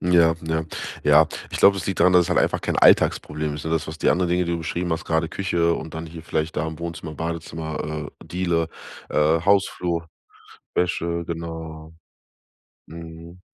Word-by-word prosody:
Ja, 85 -2 +4
ja, 80 0 0 0.4
ja. - - +6 0.2
Ich - - -4
glaube, 100 0 +6
es 90 - -4
liegt 95 - -2
daran, 90 - +6
dass 90 - +7
es - - -4
halt - - +2
einfach - - +2
kein - - -1
Alltagsproblem 75 -1 +3
ist, 75 - -7
ne? 80 - -3
Das 80 -1 0
was, 80 +1 -7
die - - +3
anderen 90 -1 +1
Dinge, 90 0 +2
die 85 - -2
du 85 - -1
beschrieben 85 +1 -2
hast, 80 0 -3
gerade 80 0 0
Küche 85 -3 +1
und 80 0 -6
dann 80 0 -5
hier 80 0 -9
vielleicht 80 -1 -2
da 80 - 0
im 80 0 -6
Wohnzimmer, 85 -2 -6
Badezimmer, 80 -2 -4
äh, - - -12
Diele, 85 -2 0 0.4
äh, 80 +2 +3
Hausflur, 90 -3 +1 0.7
Wäsche, 85 -1 0
genau. 80 -1 -6 1.0
Mhm. 85 +2 -10
80 Hz, 185 wpm, -23 LUFS, 80-85 Hz, 1.0 s, dass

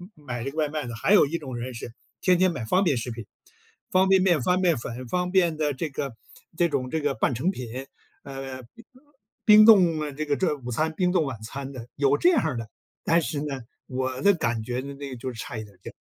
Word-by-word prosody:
买 125 -6 -6
这 135 - -3
个 155 - -13
外 150 -2 +1
卖 150 -3 -3
的， 115 - -6
还 190 - +2
有 205 - +7
一 170 +3 -2
种 130 -6 -7
人 125 +1 -5
是 115 0 -8 0.3
天 180 -1 +4
天 185 -1 +4
买 125 -9 -5
方 185 - +2
便 145 -8 +2
食 120 +1 -4
品。 115 -1 -7 0.7
方 190 +1 +4
便 190 -1 +5
面、 175 -7 +3
方 180 +7 +2
便 175 -3 +3
粉、 120 +2 -6
方 180 +5 -1
便 175 -4 +3
的 150 -1 0
这 155 +5 -2
个 135 -4 -4 0.4
这 175 - +3
种 135 -4 -2
这 160 - -1
个 145 -2 0
半 120 +1 0
成 165 +11 0
品， 130 -3 -6 0.4
呃， 135 -1 -7 0.8
冰 215 0 +8
冻， 180 -7 +6
呃， 150 - -3
这 155 +3 -4
个 145 -1 +1
这 185 -3 0
午 125 -2 -7
餐、 155 +6 0
冰 180 -1 +2
冻 175 -4 +2
晚 130 -5 -5
餐 135 +4 -6
的， 125 -3 -9
有 140 0 +3
这 360 - +4
样 160 - +1
的， 115 -1 -5 0.4
但 170 +1 +3
是 150 -2 -3
呢， 140 -3 -4 0.2
我 130 0 -3
的 200 - +6
感 120 - -1
觉 125 +2 -3
呢， 140 +1 -7
那 140 0 -7
个 130 - -6
就 125 +2 -5
是 115 - -11
差 115 -1 -5
一 - - -5
点 100 -3 -16
点。 - - -8
140 Hz, 265 characters per minute, -25 LUFS, 125-170 Hz, 0.8 s, 冰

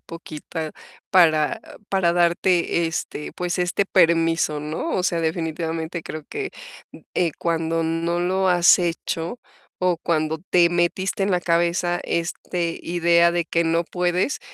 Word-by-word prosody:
poquita 160 -1 -7 0.4
para 155 -5 +4 0.3
para 190 -3 +2
darte 175 0 +2
este, 160 -2 -5
pues, 180 0 -3
este 180 +3 +1
permiso, 165 -3 +2
¿no? 155 - -4
O 185 - 0
sea, 180 -3 0
definitivamente 165 0 -3
creo 155 -1 -7
que, 410 -2 -4 0.6
eh, 170 -3 +1
cuando 165 -1 0
no 165 +1 -1
lo 190 +2 +1
has 175 0 +6
hecho 170 +3 -3 0.4
o 180 -1 +2
cuando 160 -1 -1
te 170 -1 +5
metiste 175 +3 0
en 200 - +1
la 180 -1 +2
cabeza 175 +1 +1
este 170 0 -2
idea 170 0 +3
de 175 -1 0
que 170 0 0
no 165 +1 +1
puedes, 180 - -1
170 Hz, 135 wpm, -22 LUFS, 165-180 Hz, 0.6 s, has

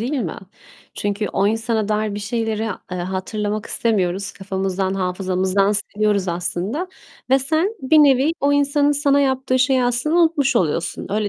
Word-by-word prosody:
değil 245 +6 -3
mi? 225 - -2 0.6
Çünkü 205 +1 -2
o 195 - 0
insana 220 -1 0
dair 210 -1 -1
bir 205 - -5
şeyleri, 220 0 -2 0.3
eee, 180 - -4
hatırlamak 205 +4 -3
istemiyoruz. 195 -3 0
Kafamızdan, 190 -1 -3
hafızamızdan 190 +1 0
siliyoruz 205 -2 0
aslında. 185 - -1 0.4
Ve 265 - +5
sen 320 - +1
bir 310 +4 +3
nevi 285 +1 +4
o 285 +1 +2
insanın 285 0 +2
sana 285 0 +2
yaptığı 265 -1 0
şeyi 255 -1 +2
aslında 245 +7 0
unutmuş 300 -7 +2
oluyorsun. 170 -1 -1
Öyle 210 0 0
215 Hz, 150 wpm, -20 LUFS, 195-270 Hz, 0.6 s, Ve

